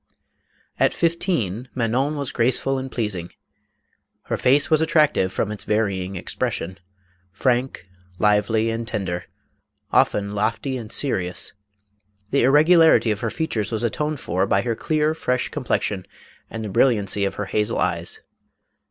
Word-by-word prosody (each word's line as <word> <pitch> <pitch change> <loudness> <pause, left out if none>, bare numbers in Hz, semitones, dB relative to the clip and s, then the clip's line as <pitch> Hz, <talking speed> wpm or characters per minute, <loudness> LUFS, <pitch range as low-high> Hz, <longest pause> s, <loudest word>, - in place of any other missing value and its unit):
At - - +3
fifteen 130 - -1
Manon 130 +5 0
was 140 -3 -3
graceful 130 +3 +1
and 130 0 -6
pleasing; 95 -7 -3 0.9
her - - -2
face 135 +2 +3
was 155 +1 +3
attractive 155 - +3
from 105 - -2
its 105 - -5
varying 100 -3 -1
expression, 95 +1 -3 0.5
frank, 125 0 0 0.3
lively 105 +2 +2
and 115 0 -4
tender, 90 -5 -3 0.7
often 100 0 +2
lofty 115 +6 -1
and 115 -3 -6
serious; 95 -10 -1 0.8
the 140 - +3
irregu 150 +7 +5
larity 160 -8 +5
of 105 - -2
her 115 -1 -2
features 115 -8 -2
was 110 0 -2
atoned 150 +5 -1
for 95 0 -1
by 100 - +2
her 120 -2 -1
clear 155 +4 0
fresh 125 -5 -1
complexion 105 -8 -2 0.4
and 110 -1 -5
the - - -4
brilliancy 100 -3 +2
of 100 0 -1
her 105 - -3
hazel 105 +3 0
eyes. 85 0 -1
115 Hz, 140 wpm, -22 LUFS, 100-135 Hz, 0.9 s, irregu